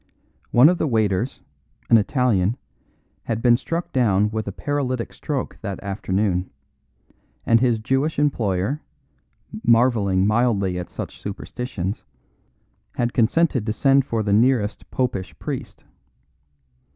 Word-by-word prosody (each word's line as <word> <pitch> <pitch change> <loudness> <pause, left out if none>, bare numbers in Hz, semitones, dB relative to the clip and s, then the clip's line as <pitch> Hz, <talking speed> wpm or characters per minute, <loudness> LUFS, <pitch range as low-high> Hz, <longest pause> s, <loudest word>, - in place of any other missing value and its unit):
One 125 +4 +6
of 180 +1 +2
the - - +1
waiters, 110 -1 0 0.4
an 115 - +6
Italian, 110 -2 +1 0.7
had 115 -1 -2
been 120 0 +5
struck 165 +7 -4
down 105 -5 +2
with 110 -1 -3
a - - -2
paralytic 130 +1 -2
stroke 140 -4 -4
that 100 -3 -5
afternoon; 95 -1 -1 1.0
and 115 0 +4
his 120 -2 +2
Jewish 135 +7 -1
employer, 125 -2 0 0.8
marvelling 115 -6 +3
mildly 105 -5 +1
at 90 - -6
such - - -7
superstitions, 100 -1 -5 0.9
had 120 0 -1
consented 130 +2 +2
to 110 - 0
send 135 +2 +3
for 115 -4 -2
the 100 -1 0
nearest 115 -1 +1
Popish 110 -9 -2
priest. - - -6
115 Hz, 120 wpm, -22 LUFS, 100-130 Hz, 1.0 s, One